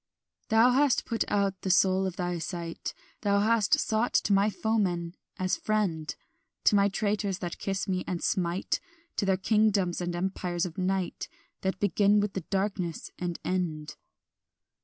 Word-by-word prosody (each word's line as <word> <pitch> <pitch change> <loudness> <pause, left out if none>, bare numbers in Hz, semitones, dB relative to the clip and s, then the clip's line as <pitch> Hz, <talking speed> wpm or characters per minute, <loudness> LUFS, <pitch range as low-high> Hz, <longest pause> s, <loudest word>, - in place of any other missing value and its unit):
"Thou 225 +2 +6
hast 275 +1 +3
put 230 - 0
out 200 -2 0
the 190 - -3
soul 190 +1 +4
of 185 - -5
thy 175 -2 -2
sight; 170 0 -5 0.3
Thou 200 -1 +2
hast 220 0 +3
sought 220 +2 0
to 205 - +3
my 200 +2 +4
foemen 190 -6 0 0.2
as 185 0 0
friend, 190 -8 -1 0.5
To - - +5
my 200 0 +4
traitors 205 -1 -1
that 175 -2 -5
kiss 195 -1 -2
me 185 -1 -1
and 175 -2 -3
smite, 180 0 0 0.4
To 200 - 0
the 190 -1 +3
kingdoms 200 -3 +2
and 175 0 -2
empires 175 -1 -1
of 175 0 -6
night 185 0 -1 0.3
That 190 0 -1
begin 205 +1 +3
with 205 -1 -1
the 190 - -3
darkness, 190 -2 -2
and 175 -1 -2
end. 160 -5 -2
190 Hz, 160 wpm, -28 LUFS, 175-205 Hz, 0.5 s, Thou